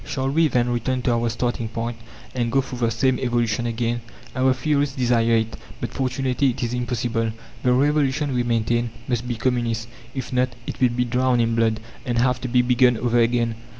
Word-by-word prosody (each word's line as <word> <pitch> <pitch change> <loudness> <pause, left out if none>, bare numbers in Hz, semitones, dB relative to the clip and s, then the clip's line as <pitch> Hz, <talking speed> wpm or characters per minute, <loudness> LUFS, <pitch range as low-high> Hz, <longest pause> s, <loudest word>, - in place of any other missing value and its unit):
Shall 135 0 -2
we, 160 +2 +4
then, 125 -4 +1
return 125 +2 -1
to 120 - +2
our 115 0 +1
starting 120 0 -2
point, 115 +1 -3 0.4
and 120 -2 -1
go 135 - +3
through 130 -2 -7
the 115 -2 +2
same 130 +3 +1
evolution 120 -2 0
again? 120 +1 -1 0.3
Our 130 0 +3
theorists 140 +1 0
desire 120 -3 +2
it, 110 0 0 0.2
but - - -4
fortunately 130 +1 0
it 125 +1 -3
is 120 0 -2
impossible. 120 -2 -1 0.3
The 125 - +2
Revolution, 145 +1 +2
we 125 - +1
maintain, 120 0 0 0.2
must 120 -1 -1
be 120 - -2
communist; 115 -1 -1 0.3
if 130 -1 -4
not, 125 0 +2 0.2
it - - -6
will 125 - +5
be 125 +1 0
drowned 125 0 +2
in 115 0 +1
blood, 115 -1 +2 0.2
and 120 -2 -2
have 125 +1 +2
to 130 - -3
be 125 0 +3
begun 125 -1 +4
over 120 +1 +1
again. 115 0 +2
120 Hz, 200 wpm, -23 LUFS, 115-130 Hz, 0.4 s, will